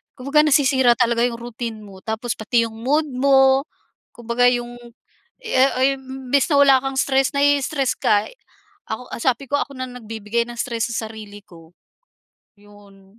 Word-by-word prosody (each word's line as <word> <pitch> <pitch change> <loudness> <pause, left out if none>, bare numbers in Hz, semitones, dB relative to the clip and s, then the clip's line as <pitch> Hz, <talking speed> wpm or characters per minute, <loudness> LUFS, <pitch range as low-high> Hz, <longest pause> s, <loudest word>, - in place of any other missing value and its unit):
Kumbaga 290 +4 +2
nasisira 265 -4 +4
talaga 235 0 +1
yung 235 -1 -6
routine 230 -2 -7
mo 195 -2 -13
tapos 220 +2 -3
pati 230 +2 +1
yung 220 - -12
mood 295 +6 0
mo. 270 +1 +3 0.5
Kumbaga 240 +1 +1
yung, 240 -1 -1 0.7
ah 265 +1 +2
ay 270 +1 +3
imbis 265 +1 -1
na - - +4
wala 275 -1 +6
kang 270 0 -3
stress, 270 +1 +1
na 280 - +2
i-stress 285 -1 +1
ka. 205 0 +2 0.6
Ako 235 +3 -7
sabi 260 +2 0
ko, 285 - +2
ako 280 - -5
na 255 0 -5
nagbibigay 225 -1 -4
ng 240 - -9
stress 235 +1 -2
sa 225 -1 -3
sarili 210 -2 -11
ko, 165 -1 -18 0.8
yun. 205 0 -20
245 Hz, 160 wpm, -21 LUFS, 220-270 Hz, 0.8 s, wala